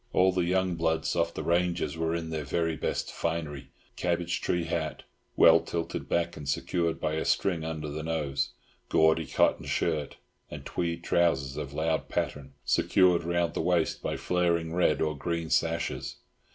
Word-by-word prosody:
All 95 +1 +5
the 90 -1 0
young 95 0 +1
"bloods" 80 -1 0
of 85 -1 0
the - - -3
ranges 85 -3 +1
were 80 0 -1
there 80 - 0
in 80 -1 -3
their 80 -2 -2
very 80 +3 -1
best - - -2
finery—cabbage 85 +2 -3
tree 90 -1 0
hat 80 -2 -3 0.3
(well - - +7
tilted 85 -1 -4
back, 85 0 0
and 75 -2 -6
secured 85 +3 0
by 80 -1 -1
a 80 - -1
string 85 -5 +1
under 80 -1 -4
the 75 +1 -4
nose), 75 -4 -1 0.4
gaudy 80 0 +3
cotton - - +2
shirt, 75 -4 -1 0.3
and - - -8
tweed 85 -1 -2
trousers 70 -6 +1
of 70 -1 -5
loud 80 0 0
pattern, 70 -1 -3
secured 90 -3 +3
round 85 0 0
the - - -1
waist 85 -3 +1
by - - -2
flaring 85 -2 0
red 80 -4 +2
or 75 -1 -1
green 85 +2 -3
sashes. 85 0 0
80 Hz, 165 wpm, -28 LUFS, 80-85 Hz, 0.4 s, well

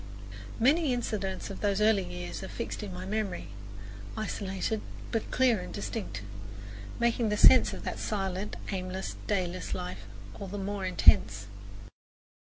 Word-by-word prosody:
Many 280 +3 +4
incidents 200 -6 -2
of 195 - -7
those 200 -1 +2
early 210 -1 +5
years 180 0 -6
are 190 - -5
fixed 235 - -4
in 205 -2 -5
my 180 +1 -6
memory, 195 - -2 0.7
isolated, 210 0 -2 0.3
but 225 -2 -1
clear 250 -5 +4
and 180 - -7
distinct, 145 - -4 0.8
making 235 -1 +2
the 210 - +1
sense - - +8
of - - -7
that - - -3
silent, 195 -1 -2 0.2
aimless, 185 0 -3
dayless 185 -3 -1
life 95 +3 -6 0.3
all 200 - -5
the 200 +2 -5
more 200 0 -2
intense. 105 - +5
195 Hz, 140 wpm, -30 LUFS, 185-215 Hz, 0.8 s, sense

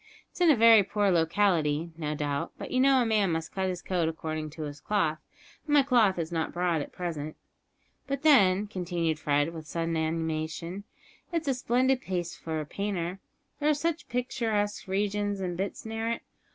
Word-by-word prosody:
It's - - -10
in 345 - +6
a 300 - +7
very 225 -2 +8
poor 200 0 +1
locality, 165 -2 +2
no 150 -2 -3
doubt, 145 -1 -2
but - - -7
you 255 - +1
know 265 -1 +5
a - - -1
man 210 -5 +2
must 160 0 -3
cut 190 -1 -1
his 180 -1 -5
coat 175 -3 0
according 155 -1 -4
to 155 +1 -7
his 145 -1 -6
cloth, 160 -7 0 0.5
and 295 - +3
my 285 - +7
cloth 235 -8 +3
is 165 0 -3
not 165 -1 -1
broad 175 -3 0
at - - -7
present. 155 -4 -4 0.7
But 275 +1 -3
then," 205 -10 +5
continued 175 -5 -2
Fred, 145 +2 +1
with 160 -2 -8
sudden 165 0 -2
animation, 160 +3 -2 0.5
"it's 330 -3 -2
a 270 - +3
splendid 255 +1 +1
place 175 -4 -3
for 160 -1 -4
a 155 - -4
painter! 190 +1 -3 0.4
There 295 0 +2
are 305 - +4
such 330 +1 -2
picturesque 225 -5 -1
regions 205 +1 -1
and 180 -2 -3
bits 195 +5 -4
near 225 +1 -2
it. 230 - -3
185 Hz, 190 wpm, -28 LUFS, 160-225 Hz, 0.7 s, very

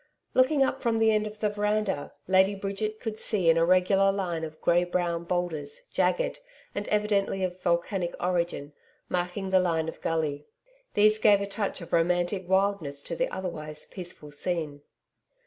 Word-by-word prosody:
Looking 270 +2 +4
up 270 0 -1
from 230 -2 +1
the 225 0 +4
end 215 0 +1
of 215 0 -9
the 210 0 0
veranda, 210 -6 -1 0.2
Lady 190 +2 +4
Bridget 200 +2 -3
could 220 -2 -4
see 185 -6 +3
an 165 - +2
irregular 185 +3 +4
line 180 -5 -2
of 155 -1 -7
grey 175 +1 +3
brown 175 -1 -1
boulders, 175 - -2
jagged - - +1 0.3
and 205 - -4
evidently 205 -2 +1
of 180 0 -3
volcanic 175 +1 0
origin, 170 -5 -1 0.4
marking 180 +2 -2
the 190 - +5
line 165 -3 +1
of 160 - -7
gully. 150 -3 -1 0.5
These 215 +1 +5
gave 205 -2 +5
a 200 - -2
touch 200 -1 -3
of 170 - -10
romantic 175 +2 +1
wildness 190 -7 +1
to - - -5
the - - 0
otherwise 155 -5 -5
peaceful 175 -5 -9
scene. 150 -2 -3
185 Hz, 165 wpm, -27 LUFS, 170-205 Hz, 0.5 s, the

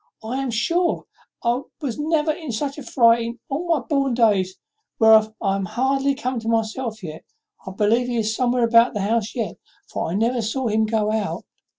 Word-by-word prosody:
I 250 +5 -3
am 270 - -2
sure 335 +10 0 0.4
I 240 +2 +1 0.2
was 270 -5 -4
never 310 0 +1
in 315 -4 -6
such 275 +6 -3
a - - -7
fright 235 -2 +4
in 235 +1 -4 0.3
my 330 -5 +2
born 275 -1 0
days, 200 -6 +2 0.4
whereof 220 -1 +5
I 195 -2 0
am 195 -1 -2
hardly 270 +6 0
come 255 -3 -3
to 225 - -8
myself 225 0 -1
yet. 160 -2 -7 0.4
I - - -4
believe 215 +5 +1
he 245 -1 -2
is 220 -1 0
somewhere 245 0 +1
about 230 0 +4
the 205 - -1
house 215 +1 -1
yet, 230 -4 -3 0.3
for - - -2
I 170 - -2
never 235 +3 +1
saw 230 +3 -2
him 220 +1 +1
go 215 -1 0
out." 215 -2 -2
230 Hz, 195 wpm, -22 LUFS, 220-265 Hz, 0.4 s, whereof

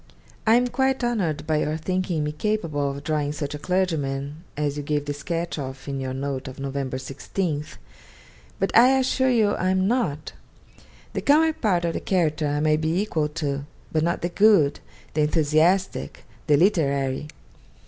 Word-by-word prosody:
I 220 - +7
am 245 +1 +4
quite 265 0 0
honoured 175 -12 -1
by 155 -1 +1
your 150 +1 0
thinking 180 -1 -1
me 150 - -1
capable 155 -5 -1
of 140 +1 -6
drawing 150 -1 -1
such 145 -1 -4
a 150 - -5
clergyman 150 -5 -1
as 145 -1 -1
you 145 - -3
gave 145 0 -1
the 145 - -2
sketch 165 +3 -3
of 135 0 -7
in 135 -1 -3
your 130 -1 -3
note 135 -1 -3
of 130 +1 -9
Nov. 135 -1 -4
16th. 140 +4 -3 0.8
But - - -1
I 255 +3 +7
assure 260 0 +2
you 220 -5 +3
I 185 - 0
am 190 0 +2
not. 205 - -1 0.8
The - - -2
comic 315 +2 +3
part 180 -6 +2
of 165 - 0
the - - -2
character 160 -5 0
I 145 0 0
might 155 0 +2
be 160 +3 +1
equal 160 -7 0
to, 145 -2 -3 0.2
but 155 - +1
not 170 +1 -1
the 175 - 0
good, 175 -7 +4 0.3
the 155 - +1
enthusiastic, 160 +5 +1 0.2
the 145 -2 +5
literary. 140 -6 +1
155 Hz, 175 wpm, -24 LUFS, 145-185 Hz, 0.8 s, I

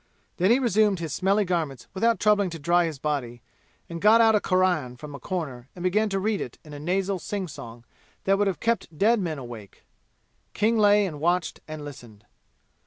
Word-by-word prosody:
Then 185 +2 +2
he 235 - +6
resumed 215 -5 +2
his 165 -4 -4
smelly 200 +2 +2
garments 160 -8 -2
without 225 +2 +1
troubling 205 -2 +3
to 165 - -6
dry 170 +3 +2
his 160 -3 -4
body, 130 -5 -3 0.4
and 170 -1 -7
got 215 +3 +6
out 225 -1 +6
a 210 - +4
Quran 180 -11 +1
from 145 +3 -9
a 140 - -8
corner 140 -10 -5
and 180 - -8
began 210 +4 +2
to 195 -1 -1
read 210 0 -1
it 120 - -6
in 150 - -11
a 145 - -7
nasal 190 +4 -1
singsong 150 - -6 0.4
that 195 - +3
would 205 - +2
have 195 - -2
kept 225 -9 -1
dead 225 +5 +3
men 165 -5 -2
awake. 120 -6 -10 0.7
King 225 +2 +2
lay 205 0 +5
and 155 -6 -5
watched 175 +1 0
and 155 -1 -7
listened. 120 -7 -12
180 Hz, 195 wpm, -25 LUFS, 145-205 Hz, 0.7 s, he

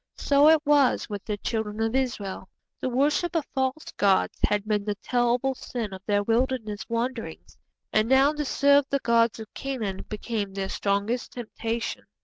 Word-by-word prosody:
So 285 +2 +5
it 320 0 +6
was 285 -3 +3
with 205 -2 -5
the 210 -1 -2
Children 220 0 -3
of 225 +1 -1
Israel. 215 -8 -2 0.3
The - - -2
worship 295 +7 +1
of 320 -3 +1
false 265 +3 -2
gods 195 -2 +2
had 210 0 +1
been 210 -2 +1
the 205 0 -2
terrible 245 +4 +1
sin 235 -5 -5
of 190 - -8
their 205 -1 +2
wilderness 225 -2 -1
wanderings, 235 +1 -4 0.4
and 215 +1 +2
now 270 +3 +5
to 300 0 -2
serve 285 0 +4
the 280 - +2
gods 230 -3 +2
of 220 -1 -10
Canaan 225 -9 -4
became 210 -2 -3
their 195 -1 -3
strongest 205 +4 -1
temptation. 230 -1 -4
235 Hz, 165 wpm, -26 LUFS, 210-265 Hz, 0.4 s, it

